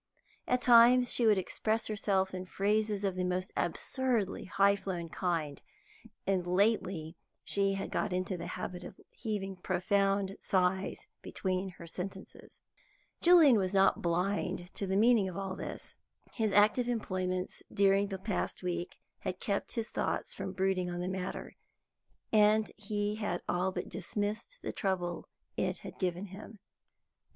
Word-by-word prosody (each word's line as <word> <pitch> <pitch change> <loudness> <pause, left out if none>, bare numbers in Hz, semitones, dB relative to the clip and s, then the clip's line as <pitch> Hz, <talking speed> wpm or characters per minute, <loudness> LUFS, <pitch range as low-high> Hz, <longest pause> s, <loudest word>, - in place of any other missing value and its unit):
At 250 0 +1
times 245 +1 +7
she 235 - +3
would 210 -2 +5
express 220 +4 -1
herself 195 -3 0
in 185 0 -5
phrases 210 +1 0
of 195 -2 +1
the 185 - -1
most 180 +2 -1
absurdly 255 -7 -1
high 200 +1 +3
flown 180 -4 -4
kind, 165 -5 -2 0.6
and 185 -2 0
lately 185 -4 +1 0.3
she 195 -1 +2
had 195 - -4
got 205 - -1
into 185 +1 -1
the 175 - -6
habit 180 0 -5
of - - -10
heaving 195 -4 -4
profound 195 +2 0
sighs 185 0 0 0.2
between 185 0 -2
her 170 - -9
sentences. 190 +3 -8 0.6
Julian 330 -8 +7
was 190 0 -1
not 195 0 +4
blind 180 +1 -1
to 200 - -3
the 190 +1 +1
meaning 220 -3 +4
of 185 - -7
all 195 -1 -3
this. - - -7 0.4
His 220 -3 0
active 210 +5 +4
employments 185 -6 -2
during 200 0 +3
the 195 -1 -4
past 190 -1 -3
week 175 0 -3 0.2
had 185 0 -4
kept 200 -1 -2
his 230 -2 -2
thoughts - - -2
from 190 - -5
brooding 190 -1 0
on 175 0 -4
the 180 - -2
matter, 185 0 -4 0.8
and 215 0 +4
he 210 0 -2
had 205 -5 -2
all 180 +2 +1
but - - -4
dismissed 205 - -4
the - - -3
trouble 180 -4 -2 0.3
it - - 0
had - - -9
given 180 0 -1
him. 205 +3 -10
195 Hz, 150 wpm, -32 LUFS, 185-210 Hz, 0.8 s, times